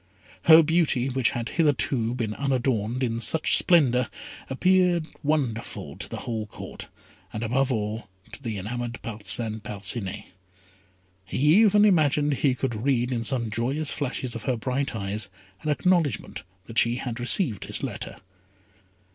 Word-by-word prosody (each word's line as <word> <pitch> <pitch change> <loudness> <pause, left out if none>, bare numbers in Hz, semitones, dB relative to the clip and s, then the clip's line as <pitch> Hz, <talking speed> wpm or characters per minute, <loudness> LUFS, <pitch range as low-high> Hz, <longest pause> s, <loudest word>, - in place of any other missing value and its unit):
Her 160 0 +9
beauty, 155 -5 +2
which 130 -3 +1
had 115 0 -3
hitherto 125 -6 +1
been 115 -4 -2
unadorned, 125 -3 0
in 115 -2 -1
such 155 +8 +2
splendour, 125 -8 +3 0.4
appeared 180 +3 +3 0.2
wonderful 140 -7 -2
to - - -4
the - - -6
whole 110 -3 -3
court, - - -9 0.4
and, 110 - -4
above 130 +4 +1
all, 110 -2 -3 0.2
to 115 - -7
the 115 -5 -4
enamoured 120 +4 -4
Parcin 110 0 -3
Parcinet. 105 -1 -3 1.0
He 95 - -5 0.2
even 210 -1 +5
imagined 150 -6 +3
he 135 -1 +1
could 120 -4 -3
read 125 -2 +1
in 120 -2 -1
some 115 -2 -1
joyous 135 +7 -1
flashes 130 -3 -3
of 115 - -7
her 125 -2 0
bright 130 +2 -2
eyes 100 0 -3 0.3
an 155 - -3
acknowledgment 155 - +1 0.2
that 115 +2 +1
she 120 0 +3
had 125 -2 -4
received 120 - +1
his - - -4
letter. - - -5
125 Hz, 145 wpm, -26 LUFS, 110-145 Hz, 1.0 s, Her